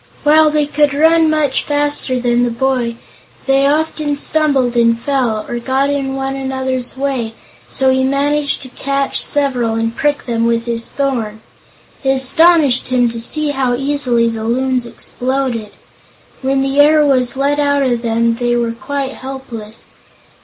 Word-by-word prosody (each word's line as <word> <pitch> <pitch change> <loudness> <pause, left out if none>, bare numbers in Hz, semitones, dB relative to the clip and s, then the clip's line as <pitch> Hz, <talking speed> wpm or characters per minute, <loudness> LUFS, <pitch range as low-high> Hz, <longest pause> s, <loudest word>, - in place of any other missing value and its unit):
While 310 +1 +5
they 300 -1 +1
could 290 -1 +1
run 320 +2 +4
much 305 -3 +1
faster 290 -3 -1
than 240 0 +1
the 245 - +1
boy, 240 -1 -1 0.5
they 270 0 +3
often 305 0 -1
stumbled 280 -5 +1
and 230 -1 +3
fell, 245 -5 -1
or 240 - -4
got 265 +3 0
in 270 -1 -2
one 270 0 -3
another's 260 -1 -3
way, 260 -5 -2 0.3
so 265 0 +2
he 260 0 +1
managed 285 +2 0
to 260 - -10
catch 275 +2 -1
several 255 -6 +1
and 225 0 -2
prick 290 -1 -1
them 230 -1 0
with 230 0 0
his 230 -1 0
thorn. 235 -6 -3 0.6
It 270 - 0
astonished 280 0 +3
him 245 -2 +2
to 230 0 -5
see 305 +5 +1
how 265 -3 0
easily 255 -3 0
the 225 -1 -3
Loons 250 +1 0
exploded. 250 -3 -3 0.7
When 270 0 0
the 270 +1 -1
air 300 +1 +5
was 260 -2 +1
let 285 +2 0
out 285 -1 +2
of 245 -3 0
them 230 0 0
they 240 0 0
were 235 -1 0
quite 270 +3 -4
helpless. 245 -5 -8
265 Hz, 160 wpm, -15 LUFS, 240-285 Hz, 0.7 s, While